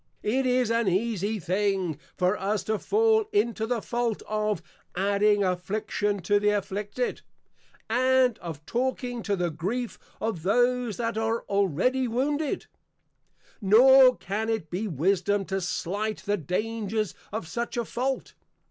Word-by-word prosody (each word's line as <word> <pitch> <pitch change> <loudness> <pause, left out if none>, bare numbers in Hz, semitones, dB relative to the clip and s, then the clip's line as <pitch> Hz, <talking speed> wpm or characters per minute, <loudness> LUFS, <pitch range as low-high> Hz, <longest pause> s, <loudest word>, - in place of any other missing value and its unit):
It 255 +5 +1
is 250 -2 +2
an 230 -2 +1
easie 210 +2 0
thing, 185 -3 0 0.2
for 180 +2 +2
us 205 +1 -1
to 215 -1 -1
fall 440 0 +3
into 235 - +1
the 240 -2 -1
Fault 235 -2 -1
of, 215 -1 -1 0.3
Adding 205 +2 +3
Affliction 200 +2 -1
to 205 +3 +3
the 210 0 +2
Afflicted, 205 +3 -2 0.7
and 255 0 +3
of, 160 -4 -8
Talking 245 -1 -2
to 205 -2 0
the 175 -2 -1
Grief 215 +10 -3 0.2
of 220 -7 -2
those 245 +4 +1
that 230 -2 -1
are 225 +1 -1
already 200 - +1
wounded. 285 +5 -1 1.0
Nor 255 +5 +7
can 215 +4 -3
it 215 -9 -2
be 195 +5 -2
wisdom 195 +5 +1
to 195 0 -2
slight 205 +5 -2
the 205 - +1
Dangers 215 +4 -2 0.2
of 210 -5 -4
such 235 +7 -4
a 235 - 0
Fault. 260 +5 -2
215 Hz, 140 wpm, -27 LUFS, 195-240 Hz, 1.0 s, Nor